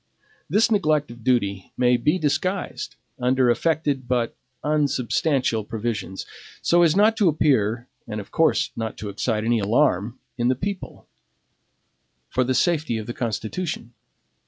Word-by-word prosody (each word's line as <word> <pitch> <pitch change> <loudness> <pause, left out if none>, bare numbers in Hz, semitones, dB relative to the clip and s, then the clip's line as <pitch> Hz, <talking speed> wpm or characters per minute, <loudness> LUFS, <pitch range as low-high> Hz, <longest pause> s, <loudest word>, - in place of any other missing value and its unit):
This 220 +7 +3
neglect 155 - +2
of 120 -1 -12
duty 100 -7 0
may 125 0 +4
be 150 +9 +2
disguised 180 +5 -2 0.2
under 125 0 +3
affected 145 -2 0
but 120 -2 0 0.3
unsubstantial 140 -4 +1
provisions, 105 -3 -4 0.3
so 175 +1 +3
as 165 -1 +4
not 215 +3 +5
to 200 -5 +4
appear, 120 -6 +1 0.2
and 105 -1 -4
of 105 - -9
course 160 - +2
not 110 -1 -4
to 105 - -5
excite 110 +2 -1
any 115 0 +2
alarm 110 +1 +1 0.2
in 120 - +2
the 130 - +3
people 195 +7 -5 1.2
for 130 - +1
the 130 +1 0
safety 155 -9 +1
of 110 - -5
the 120 - -5
Constitution. 120 - -3
125 Hz, 140 wpm, -23 LUFS, 115-155 Hz, 1.2 s, not